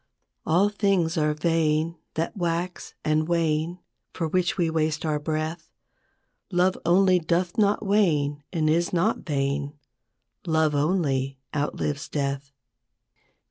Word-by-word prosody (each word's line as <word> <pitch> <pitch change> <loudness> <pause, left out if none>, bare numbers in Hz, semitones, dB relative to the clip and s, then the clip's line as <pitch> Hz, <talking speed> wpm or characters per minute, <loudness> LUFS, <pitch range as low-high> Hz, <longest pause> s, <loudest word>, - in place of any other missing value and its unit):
All 180 +6 +4
things 195 -5 +1
are 150 -2 +1
vain 160 0 +1 0.2
that 165 +7 -2
wax 175 -1 -3
and 155 0 +2
wane, 165 0 0 0.4
For 165 - -2
which 180 +2 0
we 175 -3 +2
waste 155 -1 0
our 150 -1 0
breath; 155 +2 -3 0.8
Love 180 +1 +3
only 185 +1 +5
doth 175 +2 0
not 210 -1 +2
wane 150 -8 +2
and 160 -3 0
is 170 +3 +2
not 180 +6 +1
vain, 140 -1 -2 0.7
Love 160 -2 +2
only 140 -4 0 0.2
outlives 145 0 -2
death. 140 -1 -2
160 Hz, 120 wpm, -25 LUFS, 150-175 Hz, 0.8 s, only